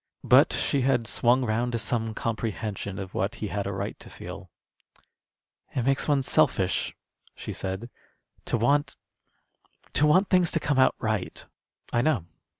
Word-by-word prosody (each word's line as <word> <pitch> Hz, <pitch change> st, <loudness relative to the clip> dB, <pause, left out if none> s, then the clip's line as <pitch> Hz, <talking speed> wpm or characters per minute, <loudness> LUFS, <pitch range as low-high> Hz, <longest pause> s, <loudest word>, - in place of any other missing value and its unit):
But -, -, +6 dB
she 140 Hz, -, 0 dB
had 125 Hz, -3 st, +2 dB
swung 125 Hz, +4 st, +3 dB
round 120 Hz, +2 st, -1 dB
to -, -, +1 dB
some 115 Hz, -1 st, -1 dB
comprehension 110 Hz, -3 st, -3 dB
of 95 Hz, -1 st, -6 dB
what 100 Hz, +5 st, -1 dB
he 105 Hz, -, -5 dB
had 100 Hz, -1 st, -3 dB
a -, -, -2 dB
right 95 Hz, -, -4 dB
to -, -, -12 dB
feel. -, -, -9 dB, 1.3 s
"It 125 Hz, -, 0 dB
makes 135 Hz, 0 st, +2 dB
one 145 Hz, -3 st, +2 dB
selfish," -, -, +1 dB, 0.4 s
she -, -, -6 dB
said, 95 Hz, +5 st, -4 dB, 0.6 s
"to -, -, 0 dB
want 140 Hz, +6 st, +1 dB, 1.0 s
to 150 Hz, -, +4 dB
want 185 Hz, +6 st, +4 dB
things 180 Hz, -2 st, +4 dB
to 165 Hz, -, +2 dB
come 145 Hz, -3 st, 0 dB
out 130 Hz, -, +4 dB
right." 110 Hz, -5 st, -3 dB, 0.5 s
"I 120 Hz, -, +3 dB
know. 130 Hz, -, +1 dB
120 Hz, 155 wpm, -26 LUFS, 105-135 Hz, 1.3 s, But